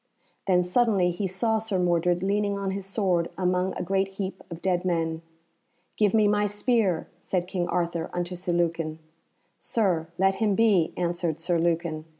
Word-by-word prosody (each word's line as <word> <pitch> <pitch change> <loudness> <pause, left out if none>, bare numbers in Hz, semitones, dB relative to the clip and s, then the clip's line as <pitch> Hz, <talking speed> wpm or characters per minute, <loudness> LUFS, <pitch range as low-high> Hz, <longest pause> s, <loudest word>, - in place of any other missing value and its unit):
Then 180 -2 +4
suddenly 190 -1 +2
he 190 +3 -2
saw 220 +4 0
Sir 215 -3 -2
Mordred 175 0 +1
leaning 200 +1 0
on 195 -1 -2
his 195 0 -5
sword 185 -4 0
among 180 0 0
a - - -2
great 195 +2 +1
heap 195 -1 -4
of 170 -2 -7
dead 180 -1 0
men. 165 -3 -1 0.7
"Give 210 -1 +2
me 215 -1 +5
my 205 0 +2
spear," 205 -4 +1
said 180 0 -2
King 180 -2 -2
Arthur 170 -2 -1
unto 175 0 -3
Sir 180 0 -3
Lucan. 165 -2 0 0.6
"Sir, 180 -8 0
let 190 +1 +2
him 210 -3 +3
be," 200 -7 +3
answered 170 -2 -1
Sir 170 0 0
Lucan. 165 -2 -1
180 Hz, 165 wpm, -26 LUFS, 170-200 Hz, 0.7 s, me